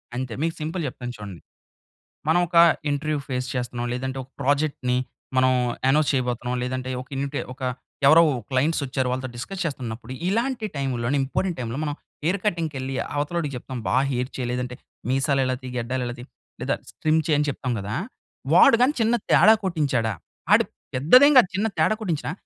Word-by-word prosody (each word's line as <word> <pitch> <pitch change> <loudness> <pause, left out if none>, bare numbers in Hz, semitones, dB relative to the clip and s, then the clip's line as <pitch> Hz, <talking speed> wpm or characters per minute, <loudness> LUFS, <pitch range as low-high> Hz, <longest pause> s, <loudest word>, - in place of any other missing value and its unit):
అంతే 125 -2 -3
మీకు 165 +1 0
సింపుల్ 165 +3 -3
చెప్తాను 125 -1 -6
చూడండి. 100 -5 -9 0.9
మనం 160 +3 +4
ఒక 170 0 0 0.3
ఇంటర్వ్యూ 150 +1 -1
ఫేస్ 130 -2 -2
చేస్తున్నాం 120 -1 -3
లేదంటే, 130 +1 -3
ఒక 130 - -20
ప్రాజెక్ట్‌ని 140 -3 +1 0.4
మనం 130 0 +5 0.4
అనౌన్స్ 150 +2 +3
చేయబోతున్నాం. 125 -1 -1
లేదంటే 130 0 -3
ఒక 130 - -13
ఇన్వి‌టె 140 +1 -2
ఒక 130 - -20 0.5
ఎవరో 160 +3 +8 0.3
క్లయింట్స్ 145 +5 +1
వచ్చారు. 130 -1 -1
వాళ్ళతో 130 0 -3
డిస్కస్ 185 +10 -5
చేస్తున్నప్పుడు 125 -5 -5 0.2
ఇలాంటి 235 +3 0
టైంలోనే 135 -1 -1
ఇంపార్టెంట్ 175 +6 -2
టైంలో 115 +1 -4
మనం 145 -1 -2 0.3
హెయిర్ 185 +5 +1
కటింగ్‌కి 165 -6 -1
వెళ్లి 130 0 -4 0.2
అవతల 145 +4 -2
వాడికి 150 -5 -2
చెప్తాం 130 +1 -7
బా - - +1 0.2
హెయిర్ 125 +1 -1
చేయి, 125 -2 -2
లేదంటే 125 0 -3 0.3
మీసాలు 135 +1 +2
ఇల 130 - 0
తీ, 130 - -6
గడ్డాలు 125 +1 -2
ఇల 120 - -4
తీ - - -7 0.4
లేదా - - 0 0.2
స్ట్రిమ్ 155 +1 +1
చెయ్యి 155 -2 +2
అని 150 - +1
చెప్తాం 130 -2 -3
గదా! 100 +2 -5 0.6
వాడు 275 - +8
గాని 270 +4 +4
చిన్న 225 +2 +3
తేడా 220 +2 +7
కొట్టించాడా, 140 - 0 0.4
అడు - - +6 0.3
పెద్దదేం 250 - +7
కాదు 190 - +7
చిన్న 215 +3 +1
తేడా 160 +7 +3
కొట్టించినా 165 -6 -2
135 Hz, 170 wpm, -24 LUFS, 125-160 Hz, 0.9 s, ఎవరో